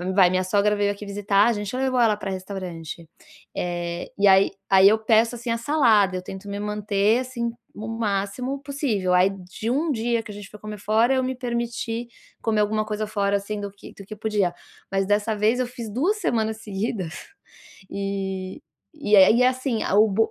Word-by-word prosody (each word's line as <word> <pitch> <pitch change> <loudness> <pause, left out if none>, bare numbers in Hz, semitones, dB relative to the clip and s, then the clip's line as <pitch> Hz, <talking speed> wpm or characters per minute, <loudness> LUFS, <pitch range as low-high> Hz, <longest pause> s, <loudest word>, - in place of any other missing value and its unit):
vai, 185 -3 +6
minha 185 0 +1
sogra 205 +2 +2
veio 205 0 +1
aqui 205 +1 -8
visitar, 200 0 +2
a 235 - +3
gente 205 +2 -4
levou 260 -1 +1
ela 215 -3 +3
pra 195 -2 -4
restaurante. 180 -4 -6 0.5
Eh, 175 -1 -3
e 200 0 +4
aí 195 0 +6 0.2
aí 195 0 +7
eu 220 - +3
peço, 225 +2 +3
assim, 235 0 -4
a 230 - +1
salada, 230 -8 +3
eu - - -4
tento 190 +2 -8
me 200 0 -4
manter, 210 +1 +1
assim, 245 -2 -3 0.2
o 220 +1 -6
máximo 225 +4 -2
possível. 235 -11 -1
Aí 180 +2 +5
de 195 +3 -6
1 300 +6 +1
dia 235 -2 0
que 210 - -9
a - - -8
gente 205 0 -10
foi 210 - -13
comer 210 -1 -7
fora, 225 +6 +2
eu 260 -1 +1
me 260 0 -2
permiti 235 -1 -3 0.3
comer 220 -2 +1
alguma 215 +1 +1
coisa 215 0 -3
fora, 200 -2 0
assim, 205 +1 -5
do 200 - -4
que 200 - -14
do 200 - -12
que 215 +2 -9
podia. 205 -4 0 0.4
Mas 195 0 +1
dessa 205 +2 +1
vez 220 +4 +2
eu 250 - 0
fiz 240 -3 -7
2 330 - +1
semanas 220 - -1
seguidas, 195 -4 -3 0.8
e 195 -1 -4 0.3
e 290 -9 0
é 190 -2 +8
e 235 +3 +4
é 250 - +6
assim, 255 -3 -1
a - - -1
o 215 +2 +6
bo 215 +2 +1
210 Hz, 205 wpm, -24 LUFS, 195-235 Hz, 0.8 s, é